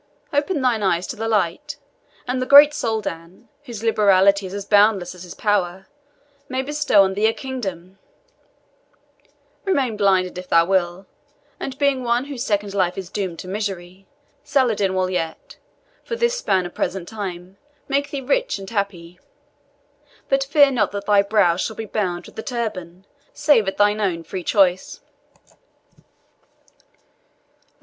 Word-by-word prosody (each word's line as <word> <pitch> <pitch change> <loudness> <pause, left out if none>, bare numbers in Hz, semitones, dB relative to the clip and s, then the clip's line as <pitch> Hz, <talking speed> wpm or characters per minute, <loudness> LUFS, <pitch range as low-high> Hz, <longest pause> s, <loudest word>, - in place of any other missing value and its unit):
Open 290 +1 0
thine 240 -4 +1
eyes 185 -2 +1
to - - -6
the 225 +1 -4
light, 225 - -1 0.5
and 255 +1 -1
the 255 - -2
great 290 +2 +9
Soldan, 215 - -4 0.2
whose 230 -4 -8
liberality 200 -3 +3
is 185 - -9
as 200 -1 -5
boundless 205 -4 +3
as 180 - -13
his 175 -1 -10
power, 190 -3 -1 0.6
may 260 0 -2
bestow 295 -7 +3
on 190 0 0
thee 210 +3 +2
a 225 - +1
kingdom; 195 -9 -6 1.6
remain 275 - 0
blinded 190 -3 +1
if 180 - -10
thou 165 0 +5
will, 185 0 0 0.5
and, 265 -1 -6
being 280 -3 +1
one 240 +2 0
whose 275 -4 -5
second 205 -1 -1
life 180 -3 0
is 190 -2 -7
doomed 185 -5 -3
to 185 - -9
misery, 190 -2 -5 0.4
Saladin 240 -9 +1
will 185 0 0
yet, 165 -3 -4 0.5
for 465 - -4
this 475 +1 +1
span 190 - 0
of 175 - -8
present 180 -1 -3
time, 190 -3 -7 0.3
make 280 +1 0
thee 280 -1 -4
rich - - 0
and 195 +1 -9
happy. 185 -5 -4 1.1
But 270 0 +2
fear 285 0 +5
not 215 -7 0
that 200 0 -5
thy 205 -1 +4
brows 200 -4 +2
shall 220 - -3
be 225 - -5
bound 185 -5 -3
with - - -15
the - - -5
turban, 195 -8 -5 0.3
save 290 -8 +3
at 195 - -3
thine 205 +1 +2
own 175 -5 -1
free 180 +2 -6
choice." 185 -3 +1
205 Hz, 155 wpm, -21 LUFS, 185-250 Hz, 1.6 s, great